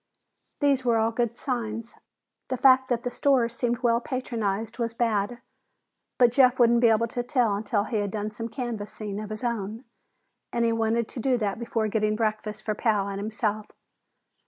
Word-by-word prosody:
These 280 Hz, -2 st, +3 dB
were 235 Hz, -2 st, +3 dB
all 225 Hz, +1 st, +2 dB
good 235 Hz, 0 st, -1 dB
signs. 230 Hz, -3 st, -3 dB, 0.5 s
The 255 Hz, -, -2 dB
fact 260 Hz, 0 st, +5 dB
that 235 Hz, -2 st, 0 dB
the 245 Hz, -, -2 dB
stores 245 Hz, -4 st, +2 dB
seemed 240 Hz, 0 st, -1 dB
well 235 Hz, 0 st, +3 dB
patronized 225 Hz, -4 st, -3 dB
was 230 Hz, -1 st, -2 dB
bad, 230 Hz, 0 st, 0 dB, 0.8 s
but 245 Hz, -3 st, +5 dB
Jeff 255 Hz, 0 st, +5 dB
wouldn't 235 Hz, 0 st, +5 dB
be 240 Hz, -, +6 dB
able 225 Hz, 0 st, +3 dB
to 245 Hz, -, -2 dB
tell 245 Hz, -4 st, +1 dB
until 205 Hz, +1 st, 0 dB
he 220 Hz, +1 st, -2 dB
had 205 Hz, -1 st, -1 dB
done 210 Hz, +1 st, -3 dB
some 230 Hz, +2 st, -5 dB
canvassing 215 Hz, -4 st, -5 dB
of 215 Hz, -1 st, -6 dB
his 215 Hz, +3 st, -6 dB
own, 225 Hz, -1 st, -3 dB, 0.7 s
and 235 Hz, -1 st, +1 dB
he 230 Hz, -, +2 dB
wanted 225 Hz, 0 st, +1 dB
to -, -, -6 dB
do 255 Hz, +1 st, +2 dB
that 210 Hz, -2 st, -2 dB
before 230 Hz, -2 st, -1 dB
getting 215 Hz, 0 st, +1 dB
breakfast 215 Hz, -1 st, -2 dB
for 215 Hz, -, -1 dB
Pal 210 Hz, -2 st, +1 dB
and 200 Hz, 0 st, -4 dB
himself. 215 Hz, 0 st, -2 dB
230 Hz, 180 wpm, -26 LUFS, 215-240 Hz, 0.8 s, be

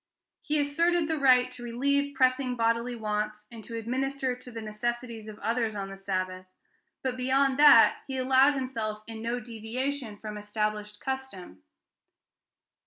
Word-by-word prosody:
He 300 Hz, 0 st, 0 dB
asserted 330 Hz, +3 st, +2 dB
the 320 Hz, -1 st, -1 dB
right 255 Hz, -2 st, +5 dB
to 250 Hz, -, -12 dB
relieve 280 Hz, +4 st, 0 dB
pressing 255 Hz, -1 st, +2 dB
bodily 235 Hz, +1 st, 0 dB
wants, 210 Hz, -1 st, -3 dB
and 225 Hz, -2 st, -10 dB
to 230 Hz, -, -6 dB
administer 260 Hz, +3 st, -2 dB
to 250 Hz, 0 st, -13 dB
the 230 Hz, -2 st, -7 dB
necessities 225 Hz, +1 st, -4 dB
of 215 Hz, -1 st, -9 dB
others 225 Hz, -1 st, -1 dB
on 195 Hz, -1 st, -4 dB
the -, -, -7 dB
Sabbath, 185 Hz, -1 st, -3 dB, 0.6 s
but 260 Hz, -1 st, -1 dB
beyond 265 Hz, +2 st, +2 dB
that 295 Hz, -1 st, +8 dB
he 265 Hz, -1 st, -4 dB
allowed 265 Hz, +2 st, +4 dB
himself 225 Hz, -5 st, -3 dB
in 225 Hz, -1 st, -7 dB
no 235 Hz, +2 st, -2 dB
deviation 240 Hz, +1 st, -4 dB
from 210 Hz, 0 st, -7 dB
established 210 Hz, 0 st, -3 dB
custom." 265 Hz, -, -6 dB
240 Hz, 150 wpm, -28 LUFS, 215-265 Hz, 0.6 s, that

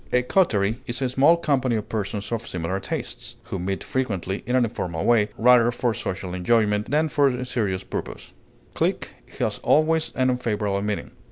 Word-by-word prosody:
A 125 Hz, -, +3 dB
coterie 115 Hz, -, +1 dB
is 120 Hz, 0 st, -2 dB
a 130 Hz, -, +1 dB
small 140 Hz, +7 st, +5 dB
company 135 Hz, -7 st, +1 dB
of 110 Hz, -, -3 dB
persons 105 Hz, -1 st, -3 dB
of 115 Hz, 0 st, -3 dB
similar 90 Hz, +2 st, -3 dB
tastes, -, -, -5 dB
who 95 Hz, -, -5 dB
meet 95 Hz, +2 st, -3 dB
frequently 100 Hz, -7 st, -2 dB
in 125 Hz, -, +1 dB
an 130 Hz, -, +4 dB
informal 90 Hz, -8 st, -3 dB
way, 110 Hz, -3 st, +4 dB
rather 120 Hz, 0 st, +5 dB
for 120 Hz, -1 st, 0 dB
social 95 Hz, -3 st, -4 dB
enjoyment 105 Hz, +2 st, +1 dB
than 155 Hz, +2 st, +2 dB
for 145 Hz, -2 st, +3 dB
any 125 Hz, 0 st, -3 dB
serious 100 Hz, -7 st, -1 dB
purpose. -, -, -6 dB, 0.4 s
Clique -, -, -1 dB, 0.3 s
has -, -, -1 dB
always 160 Hz, +1 st, +2 dB
an 130 Hz, -1 st, +2 dB
unfavorable 105 Hz, -5 st, -1 dB
meaning. 105 Hz, 0 st, -3 dB
115 Hz, 175 wpm, -24 LUFS, 100-130 Hz, 0.4 s, small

